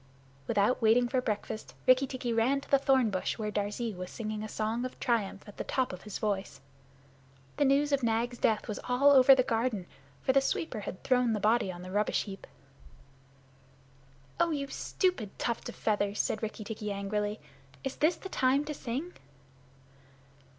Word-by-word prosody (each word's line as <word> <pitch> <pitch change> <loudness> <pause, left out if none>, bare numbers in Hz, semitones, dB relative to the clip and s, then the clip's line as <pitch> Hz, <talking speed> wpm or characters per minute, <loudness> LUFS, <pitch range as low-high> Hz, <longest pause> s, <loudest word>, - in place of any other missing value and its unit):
Without 205 +6 +2
waiting 230 +2 +4
for 255 +1 0
breakfast, 215 -1 -4
Rikki 255 +1 +5
tikki 250 -2 -3
ran 240 +5 +2
to - - -16
the 275 - +6
thornbush 260 -8 +1
where 210 -1 -3
Darzee 210 +2 -2
was 180 -1 -6
singing 215 -2 -4
a 215 - -5
song 220 +3 -2
of 255 - -6
triumph 215 -5 -1
at 205 - -12
the - - -3
top 255 -6 -1
of 185 - -8
his 210 - -6
voice. 195 -9 -2 1.0
The 290 - +3
news 280 +2 +3
of 280 -1 +2
Nag's 235 +1 0
death 220 -1 +1
was 210 - -4
all 270 +3 +5
over 270 -1 +8
the 255 - +3
garden, 225 -5 -1 0.4
for 260 - +2
the 275 - +5
sweeper 270 -2 -2
had 190 -2 -7
thrown 250 -3 +3
the 210 - -1
body 215 -1 +2
on 175 0 -9
the 185 - -8
rubbish 205 +2 +1
heap. 195 -2 -9 1.9
"Oh, 340 - +3
you 290 -3 -1
stupid 275 - -1
tuft 235 -1 -2
of - - -8
feathers!" 205 -1 0
said - - 0
Rikki 220 0 -4
tikki 210 -1 -5
angrily. 205 +1 -2 0.4
"Is 270 - -4
this 315 +4 +3
the - - -8
time 270 -1 +2
to 300 - -4
sing?" 280 +7 -4
230 Hz, 180 wpm, -30 LUFS, 210-260 Hz, 1.9 s, over